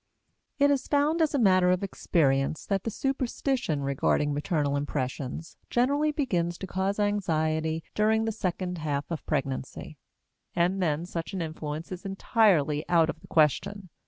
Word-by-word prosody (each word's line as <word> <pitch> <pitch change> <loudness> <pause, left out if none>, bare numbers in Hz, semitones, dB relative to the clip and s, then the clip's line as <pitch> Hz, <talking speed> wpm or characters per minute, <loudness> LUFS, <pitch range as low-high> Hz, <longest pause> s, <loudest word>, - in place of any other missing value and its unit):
It 285 0 +4
is 275 -2 0
found, 300 +3 +2
as 310 -2 +2
a - - +3
matter 185 -6 +4
of 180 +1 +1
experience, 140 -6 0
that 195 -2 -1
the - - 0
superstition 255 - -1
regarding 140 +1 +1
maternal 145 -1 0
impressions 140 +2 -4
generally 285 +5 +2
begins 175 - -1
to - - -6
cause 190 +2 -1
anxiety 160 -6 0
during 220 +1 +2
the 225 - 0
second 180 -3 -3
half 145 -2 -2
of 165 - -3
pregnancy; 135 0 -3 0.6
and 180 +3 +1
then 160 -1 0
such 170 0 -5
an 190 - -2
influence 155 0 -6
is 185 -1 -6
entirely 190 -7 +2
out 165 -2 +4
of 160 - -15
the - - -16
question. 185 +5 +1
175 Hz, 155 wpm, -27 LUFS, 155-205 Hz, 0.6 s, It